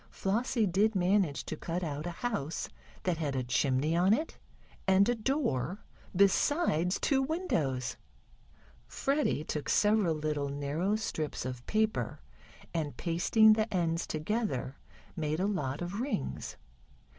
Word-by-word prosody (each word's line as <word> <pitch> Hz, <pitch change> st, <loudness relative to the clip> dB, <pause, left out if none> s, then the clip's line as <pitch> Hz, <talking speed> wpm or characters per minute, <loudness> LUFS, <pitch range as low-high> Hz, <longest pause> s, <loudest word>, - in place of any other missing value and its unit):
Flossie 225 Hz, +3 st, 0 dB
did 205 Hz, +4 st, +2 dB
manage 185 Hz, -4 st, +2 dB
to -, -, -4 dB
cut 175 Hz, +2 st, -3 dB
out 150 Hz, 0 st, -3 dB
a 175 Hz, +7 st, -7 dB
house, 165 Hz, -, -2 dB, 0.3 s
that 180 Hz, -3 st, 0 dB
had 145 Hz, -4 st, -1 dB
a 130 Hz, -, 0 dB
chimney 135 Hz, +5 st, +1 dB
on 185 Hz, +4 st, +4 dB
it, 315 Hz, +5 st, -5 dB, 0.5 s
and 190 Hz, +2 st, +5 dB
a 245 Hz, -, +3 dB
door, 215 Hz, -, -1 dB, 0.3 s
besides 195 Hz, -, +3 dB
two 270 Hz, -2 st, +2 dB
windows. 175 Hz, -, -1 dB, 0.9 s
Freddie 275 Hz, -, 0 dB
took 150 Hz, -1 st, -4 dB
several 210 Hz, -6 st, +3 dB
little 150 Hz, -2 st, -1 dB
narrow 145 Hz, +8 st, -1 dB
strips 155 Hz, -, -3 dB
of 125 Hz, -1 st, -5 dB
paper, 215 Hz, 0 st, 0 dB, 0.5 s
and 155 Hz, -4 st, -2 dB
pasting 215 Hz, +6 st, +4 dB
the 215 Hz, 0 st, 0 dB
ends 170 Hz, -3 st, 0 dB
together, 155 Hz, -, -2 dB, 0.4 s
made 155 Hz, -1 st, -1 dB
a 190 Hz, -, +1 dB
lot 150 Hz, -7 st, -2 dB
of 180 Hz, +4 st, -4 dB
rings. 250 Hz, -, -3 dB
175 Hz, 135 wpm, -31 LUFS, 150-215 Hz, 0.9 s, and